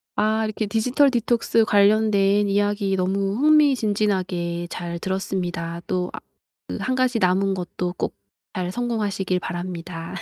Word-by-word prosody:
아 220 +1 +1
이렇게 215 0 -2
디지털 245 +7 +2
디톡스 235 -1 +2
관련된 205 -1 +3
이야기 205 -1 +1
너무 195 +2 0
흥미진진하게 205 - +2
잘 170 -1 -5
들었습니다. 175 -3 -3
또 180 -1 -1
아 - - -6 0.5
그 - - -4
1 255 - -1
가지 255 -2 +1
남은 190 +2 +2
것도 180 0 -4
꼭 - - -3 0.4
잘 180 -1 -2
성공하시길 205 -6 -1
바랍니다. 175 -2 -6
195 Hz, 295 characters per minute, -23 LUFS, 180-220 Hz, 0.5 s, 관련된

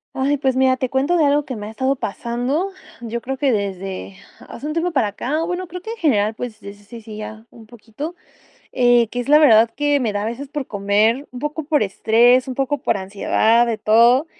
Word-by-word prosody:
Ay, 280 +2 +1
pues, 265 -2 0
mira, 260 0 +3
te 255 - -2
cuento 275 +7 +1
de 315 - +3
algo 290 +1 +2
que 255 - -5
me 210 -1 -7
ha - - -7
estado 260 +5 -1
pasando, 245 - -2 0.3
yo 235 0 -4
creo 265 +2 -4
que 275 -1 +1
desde 195 -2 -4 0.3
hace - - -9
un 305 - -3
tiempo 335 +2 -1
para 265 -9 +1
acá, 280 +10 -2
bueno, 360 +2 -3
creo 360 +2 -8
que, 440 - -7
en 465 - -7
general, 220 - +1
pues, 225 -1 -7
desde 200 0 -11
sí, 230 +2 -11
sí, 215 -1 -10
ya 215 +1 -8
un 225 -2 -15
poquito, 235 +8 -8 0.6
eh, 245 -2 +3
que 245 - -6
es 245 - -4
la 300 +1 +7
verdad 230 -6 +6
que 290 -1 +1
me 235 -6 -1
da 205 0 -2
a - - -3
veces 240 +5 -5
por 290 -2 -5
comer, 210 +6 +1
un 250 - -8
poco 295 +2 -4
por 300 -2 +1
estrés, 235 +5 +3
un 260 - -5
poco 275 +2 -1
por 250 - 0
ansiedad, 215 +4 +2
de 230 -2 -2
todo, 235 +7 +4
245 Hz, 230 wpm, -20 LUFS, 220-285 Hz, 0.6 s, la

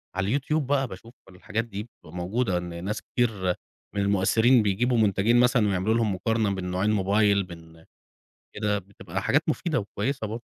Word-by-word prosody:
على 95 +8 +1
الYouTube 150 +3 -2
بقى 135 -1 +1
باشوف 115 +4 -11 0.2
الحاجات 105 +4 -4
دي، 105 -3 -6
بتبقى 85 -8 -16
موجودة، 95 +3 0
إن 85 -1 -5
ناس 105 +2 -2
كتير 105 -7 0 0.4
من 100 - +1
المؤثرين 105 +5 +4
بيجيبوا 120 +5 +1
منتجين 110 +2 +3
مثلًا 125 -3 +4
ويعملوا 95 +2 +1
لهُم 115 -3 +1
مقارنة 110 +1 0
بين 95 -1 -4
نوعين 95 +4 +1
موبايل، 100 0 +3
بين 80 -2 -13 0.7
كده، 105 -1 0
بتبقى 95 -1 -7
حاجات 145 +9 +3
مفيدة 160 0 0
وكويسة 110 +4 -3
برضو. 115 +3 -6
105 Hz, 165 wpm, -26 LUFS, 95-115 Hz, 0.7 s, المؤثرين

